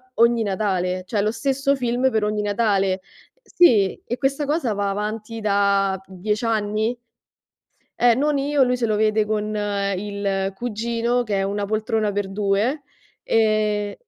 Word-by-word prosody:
ogni 235 0 +3
Natale, 185 -3 -1
cioè 205 -2 0
lo 215 - +1
stesso 275 +4 0
film 250 0 0
per 220 -2 0
ogni 210 0 -1
Natale. 200 -3 +1 0.4
Sì, 240 - +3
e 240 - -3
questa 275 +1 0
cosa 290 -6 0
va 200 0 -1
avanti 215 +2 -4
da 200 -2 +2
10 210 +5 -3
anni? 220 +1 0 1.0
Eh, 240 -1 +5
non 290 +3 +1
io, 280 0 +2
lui 250 0 +1
se 240 -2 -1
lo 215 - +1
vede 215 0 +2
con 215 0 -2 0.4
il 195 -1 -2
cugino 235 +2 -1
che 210 -4 -2
è 195 - 0
"Una 200 +1 -2
poltrona 215 0 -1
per 205 -1 -2
due", 210 +8 0 0.4
ehm 215 -2 +1
215 Hz, 150 wpm, -22 LUFS, 200-235 Hz, 1.0 s, Eh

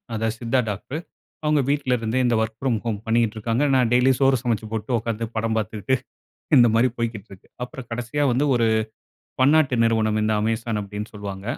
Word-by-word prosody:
அதாவது 110 0 -2
சித்தா 120 +2 +1
டாக்டரு. 105 +8 -5 0.5
அவங்க 150 -1 +3
வீட்லருந்தே 125 -4 0
இந்த 120 -1 +2
வொர்க் 110 0 -3
ப்ராம் 130 -4 0
ஹோம் 110 -4 -2
பண்ணிக்கிட்டுருக்காங்க. 115 +2 +1
நான் 125 -3 +3
டெய்லியும் 125 +1 +4
சோறு 135 -1 +4
சமைச்சு 115 -3 -1
போட்டு, 110 +2 -3
உட்கார்ந்து 115 0 -3
படம் 110 0 0
பார்த்துக்கிட்டு 110 +2 -1 0.6
இந்த 120 -2 +7
மாரி 120 +3 +4
போய்க்கிட்டுருக்கு. 110 -4 -5 0.2
அப்பறம் 125 0 -7
கடைசியா 120 +5 -2
வந்து 130 +4 +1
ஒரு 115 -2 +2 0.7
பன்னாட்டு 140 0 +4
நிறுவனம், 110 -1 +2
இந்த 110 0 +1
Amazon 115 +1 -1
அப்டீன்னு 105 +1 -6
சொல்லுவாங்க. 100 -2 -7
115 Hz, 160 wpm, -23 LUFS, 110-125 Hz, 0.7 s, இந்த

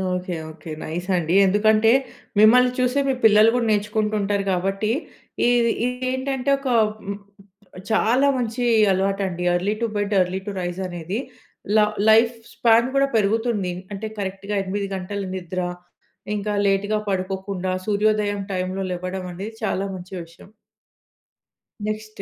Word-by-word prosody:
Okay. 180 0 -4 0.2
Okay. 160 0 -10
Nice 175 +4 -5
అండి. 170 +2 0
ఎందుకంటే, 215 +3 +4 0.5
మిమ్మల్ని 250 +4 +6
చూసే 255 +2 +2
మీ 265 - +2
పిల్లలు 215 +1 +7
కూడా 240 -2 +1
నేర్చుకుంటూ 210 +1 0
ఉంటారు. 200 0 0
కాబట్టి 195 +4 -1 0.6
ఇది 240 -1 +3
ఇది 250 +1 -3
ఏంటంటే, 265 0 -2
ఒక 275 - -6 1.2
చాలా 245 +6 +3
మంచి 245 0 -2 0.3
అలవాటండి. 190 -2 -1
Early 195 +4 0
to 230 - +1
bed, 205 0 -1
early 180 +1 -1
to - - -2
rise 175 +1 -4
అనేది 175 +5 -4 0.6
ల - - +6 0.3
లైఫ్ 230 +2 +5 0.2
స్పాన్ 230 0 +4
కూడా 275 0 +4
పెరుగుతుంది. 215 -2 +1 0.2
అంటే 215 +2 -4
కరెక్ట్‌గా 195 +1 -4
8:00 200 +1 -3
గంటల 195 +2 -4
నిద్ర. 185 0 -5 0.8
ఇంకా 210 +1 -2 0.2
లేట్‌గా 205 +2 +1
పడుకోకుండా 190 0 -2
సూర్యోదయం 210 -1 +1
టైమ్‌లో 185 +1 -2
లేవడం 185 +1 -4
అనేది 200 +5 -6
చాలా 195 -1 0
మంచి 180 +1 -10
విషయం. 170 +3 -17 1.4
నెక్స్ట్. 215 -1 -5
205 Hz, 130 wpm, -22 LUFS, 185-220 Hz, 1.4 s, పిల్లలు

